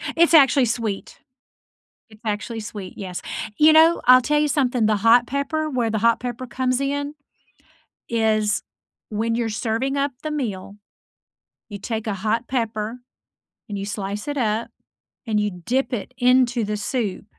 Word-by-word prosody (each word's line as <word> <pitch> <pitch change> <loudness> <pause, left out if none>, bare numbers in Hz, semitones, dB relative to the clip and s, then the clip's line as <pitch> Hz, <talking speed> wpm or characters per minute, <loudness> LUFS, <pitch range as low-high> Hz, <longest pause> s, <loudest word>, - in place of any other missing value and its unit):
It's 335 0 +4
actually 275 -3 +6
sweet. 225 -3 -3 0.9
It's 215 -1 -18
actually 220 +1 -3
sweet. 205 -3 -8
Yes, 185 -3 -6 0.3
you 310 +1 +6
know, 325 +2 +5
I'll 255 +1 +8
tell 295 +4 +1
you 300 - +2
something, 250 -6 +1
the 215 -1 +2
hot 230 +4 +5
pepper 300 +4 -2
where 240 -4 0
the 220 - 0
hot 230 +2 +3
pepper 245 +1 -5
comes 255 +1 -1
in, 285 +1 -2 0.9
is 215 -2 +1 0.5
when 225 +2 -1
you're 235 -1 -1
serving 225 +5 -2
up 280 0 0
the 310 - -3
meal, 210 -9 -4 0.9
you 205 - -7
take 220 +2 -4
a 215 - 0
hot 220 +5 -1
pepper 225 -1 -2 0.7
and 205 - -5
you 195 - -4
slice 205 +1 -5
it 290 0 -3
up 225 -2 0 0.6
and 215 -3 0
you 210 0 +1 0.2
dip 260 +2 0
it 240 +2 -4
into 250 -1 +3
the 210 0 -2
soup 210 -3 -3
230 Hz, 160 wpm, -22 LUFS, 215-265 Hz, 0.9 s, I'll